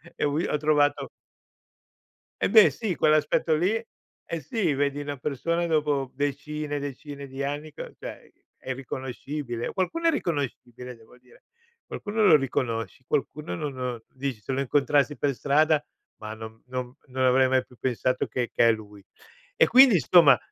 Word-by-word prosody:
e - - -3
ho 145 - +1
vi 160 +4 0
ho 150 - 0
trovato 150 -1 +2 1.3
E - - +2
beh 450 - +8
sì, 205 -7 -3
quell'aspetto 155 +1 +2
lì 180 +7 +1 0.5
eh 165 - -4
sì, 165 - -1
vedi 140 +1 0
una 145 0 -4
persona 165 +6 -1
dopo 145 -4 0
decine 145 +2 -3
e - - -2
decine 140 0 -7
di 135 +1 -5
anni, 145 +2 -4
c - - -9
cioè - - -9 0.3
è - - -11
irriconoscibile. 130 -1 -5
Qualcuno 330 - -1
è - - +7
riconoscibile, 125 - -4
devo 115 +2 -19
dire, 125 0 -23 0.4
qualcuno 215 +1 -1
lo 160 - +8
riconosci, 125 -3 -2
qualcuno 145 -7 -2
non 140 +9 -4
non, 125 -3 -4
dici: 130 -4 -4
"Se 135 - -5
lo 135 - -1
incontrassi 145 +2 +2
per 140 -1 0
strada, 150 +3 +2 0.3
ma 110 0 -7
non 110 0 -10
non 125 0 -5
non 130 0 -2
avrei 130 +1 +4
mai 130 0 +2
più 125 - -20
pensato 130 +1 0
che 125 -2 -2
che 115 - +4
è - - +6
lui." 105 -2 -7 0.5
E - - +5
quindi, 255 -3 +7
insomma 155 -5 +6
140 Hz, 165 wpm, -26 LUFS, 125-150 Hz, 1.3 s, beh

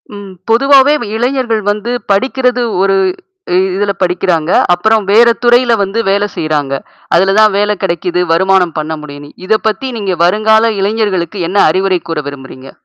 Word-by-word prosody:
ம். 200 -1 -10 0.2
பொதுவாவே 275 +4 +4
வ - - -4
இளைஞர்கள் 240 -2 -1
வந்து 210 +3 -2 0.2
படிக்கிறது 250 +4 0 0.2
ஒரு 195 0 +2 0.8
இதுல 200 0 -1
படிக்கிறாங்க. 175 -3 0 0.3
அப்புறம் 215 +2 0
வேற 230 +3 +5 0.2
துறையில 240 -1 +3
வந்து 200 +4 -2
வேலை 200 +1 +1
செய்றாங்க. 150 -3 -2 0.4
அதுல 195 +3 +2
தான் 215 -2 +4
வேலை 210 +1 +1
கிடைக்குது, 175 0 -1
வருமானம் 190 -1 +1
பண்ண 155 +1 -5
முடியும்னு. 145 0 -11 0.2
இத 220 +1 +1
பத்தி 220 +5 -4
நீங்க 195 -3 -2
வருங்கால 220 +4 +2
இளைஞர்களுக்கு 200 -2 -2
என்ன 195 - -2
அறிவுரை 190 +1 0
கூற 165 -2 -2
விரும்புறீங்க? 135 -1 -10
200 Hz, 145 wpm, -12 LUFS, 175-225 Hz, 0.8 s, வேற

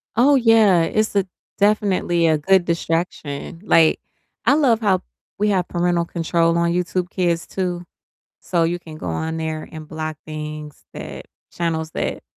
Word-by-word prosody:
Oh, 275 +5 +5
yeah, 225 -8 +5
it's 215 +5 0
a 195 - +3 0.3
definitely 195 -5 +2
a 155 -1 +3
good 185 +3 +3
distraction, 165 -2 -3
like, 165 -6 +4 0.5
I - - +5
love 260 -7 +3
how 190 -4 +2 0.4
we 210 +1 +1
have 185 -3 +1
parental 175 -1 0
control 170 0 +1
on 170 0 +2
YouTube 180 0 -1
Kids 170 -4 0
too, 180 -2 -3 0.6
so 175 -3 0
you 175 +2 0
can 160 -2 -11
go 90 - -8
on 160 - -2
there 160 -1 -4
and 155 -1 -9
block 155 0 -5
things 150 -1 -7
that - - -8 0.3
channels 160 -2 -2
that - - -3
170 Hz, 155 wpm, -21 LUFS, 160-190 Hz, 0.6 s, Oh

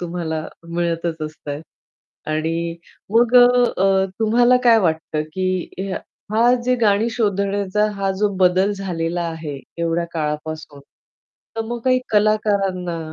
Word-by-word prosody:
तुम्हाला 170 -2 -3 0.3
मिळतच 170 -1 -2
असतात. 150 -1 -7 0.7
आणि 165 +2 -2 0.3
मग 235 +2 +3
अ, 245 -5 +5 0.3
तुम्हाला 240 +3 +4
काय 230 -2 +7
वाटतं 160 -3 -1
की 185 +1 -3 0.4
हा 235 +3 +4
जे 255 0 +3
गाणी 220 -1 +2
शोधण्याचा 200 -2 0
हा 195 0 0
जो 210 +1 +2
बदल 185 +2 +3
झालेला 175 -3 -2
आहे 160 -4 -6 0.2
एवढ्या 170 0 0
काळापासून, 150 -1 -4 0.8
तर - - -1
मग 235 +1 -5
काही 255 -1 +3
कलाकारांना 200 -5 +1
185 Hz, 115 wpm, -20 LUFS, 165-215 Hz, 0.8 s, काय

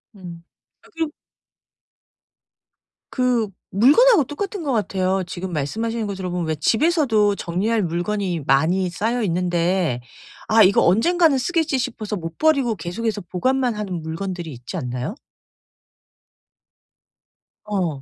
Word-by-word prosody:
음. 175 -3 -10 0.4
아끔 325 -2 -4 2.0
그 250 -4 +1 0.2
물건하고 300 - +5
똑같은 390 - -5
것 285 - -1
같아요. 190 -4 0
지금 185 +1 -5
말씀하시는 220 +10 -2
거 200 - -4
들어 185 -1 -4
보면 175 -2 -2
왜 160 - 0
집에서도 220 - +2
정리할 200 +6 -1
물건이 175 +1 -2
많이 170 +7 +2
쌓여 225 +7 -1
있는데 175 -5 0 0.5
'아 220 0 +6
이거 195 +1 +5
언젠가는 305 - +4
쓰겠지' 320 0 0
싶어서 230 -4 -3
못 165 -3 -7
버리고 280 -7 +2
계속해서 205 +5 -3
보관만 255 +5 0
하는 195 -5 -4
물건들이 170 +1 -5
있지 125 +8 -7
않나요? 125 - -4 2.5
어. 180 -9 -2
200 Hz, 270 characters per minute, -22 LUFS, 175-245 Hz, 2.5 s, 아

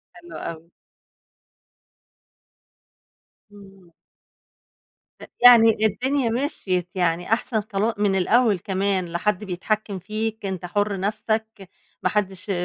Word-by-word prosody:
حلو 175 -2 -11
أوي. 165 0 -7 2.8
إمم. 195 -3 -17 1.3
أ - - -10 0.2
يعني 225 -3 +7
الدنيا 255 +4 0
مشيت 195 - -2
يعني 175 +3 0
أحسن 235 -1 0
طلا 215 +1 -1
من 205 -2 +1
الأول 210 +1 +3
كمان، 190 -1 -1
لا 170 0 -4
حد 210 +2 -1
بيتحكم 200 +1 -3
فيك 215 +2 -4
أنت 185 -2 -4
حُر 205 +2 -1
نفْسك، 215 0 -3 0.3
ما - - +2
حدش 195 -1 -2
200 Hz, 105 wpm, -23 LUFS, 185-220 Hz, 2.8 s, يعني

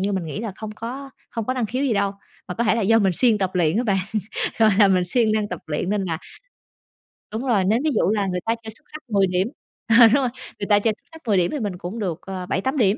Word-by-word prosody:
như 200 +1 0
mình 185 -3 -1
nghĩ 160 +7 -5
là 220 -4 -4
không 215 -1 -6
có 270 +4 -6 0.2
không 230 -2 -3
có 255 - -1
năng 245 -4 -1
khiếu 255 +6 -2
gì 250 - +1
đâu. 200 -1 +1 0.4
Mà 180 - -4
có 235 - 0
thể 220 - +3
là 230 - 0
do 225 +3 +4
mình 195 -3 +2
siêng 225 +2 +4
tập 190 -2 0
luyện 170 +1 +2
á 240 - +2
bạn, 195 -3 +2 0.6
gọi 220 -1 +6
là, 200 -2 +7
mình 185 -2 +3
siêng 220 +3 +2
năng 210 -1 0
tập 180 - -5
luyện 155 +5 -2
nên 205 -2 0
là 165 -3 -2 1.1
đúng 220 +2 -3
rồi. 205 -7 +2
Nếu 220 +5 +3
ví 315 - +2
dụ 190 - +2
là 205 -2 +1
người 180 -1 -1
ta 230 +1 +1
chơi 220 - -6
xúc 295 +8 -15
xắc 305 - -7
10 200 -2 +3
điểm 180 +2 0 0.5
ờ, 230 - +10
đúng 225 - +2
rồi, 265 -3 +2 0.3
người 200 - -3
ta 205 0 +6
chơi 220 +1 +2
xúc - - -41
sắc 320 0 -13
10 200 -3 +3
điểm 175 -1 +2
thì 295 - -3
mình 200 -5 -3
cũng 185 +6 -6
được 175 -5 -2
ờ 185 -1 -6
7-8 260 +11 -1
điểm, 210 -3 +3
210 Hz, 285 wpm, -22 LUFS, 190-230 Hz, 1.1 s, ờ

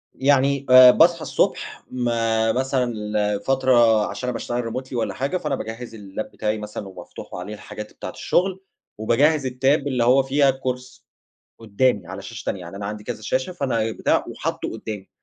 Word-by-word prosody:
يعني 140 0 +2
آآ 130 0 +10
باصحى 170 +2 +4
الصبح، - - -1
ما 115 -2 +1
مثلًا 130 +1 0
ال 105 -3 -1
فترة 120 -5 +4
عشان 125 - -5
أنا - - -2
باشتغل 120 0 -3
Remotely 130 0 -6
والّا 115 -5 -1
حاجة، 135 - -1
فأنا 150 -5 -2
باجهز 115 0 -7
اللاب 105 0 -7
بتاعي 110 0 -2
مثلًا 105 -1 -7
ومفتوح 90 -2 -11
وعليه 90 +4 -6
الحاجات 105 0 -9
بتاعة - - -7
الشُغل، 190 +1 0 0.4
وباجهز 135 +6 +2
الTab 125 - -7 0.3
اللي 125 -4 +1
هو 130 +3 +5
فيها 135 +1 +3
الCourse 125 -1 -5 0.6
قُدامي 110 -2 0
على 95 +2 -7
شاشة 115 +2 -8
تانية، 95 - -3
يعني 90 +2 -9
أنا 100 0 -5
عندي 105 0 -6
كذا 110 - -6
شاشة، 130 +9 -1
فأنا 115 -9 -1
بتاع - - +1
وحاطُه - - -4
قُدامي، 105 -3 -7
120 Hz, 170 wpm, -22 LUFS, 105-130 Hz, 0.6 s, آآ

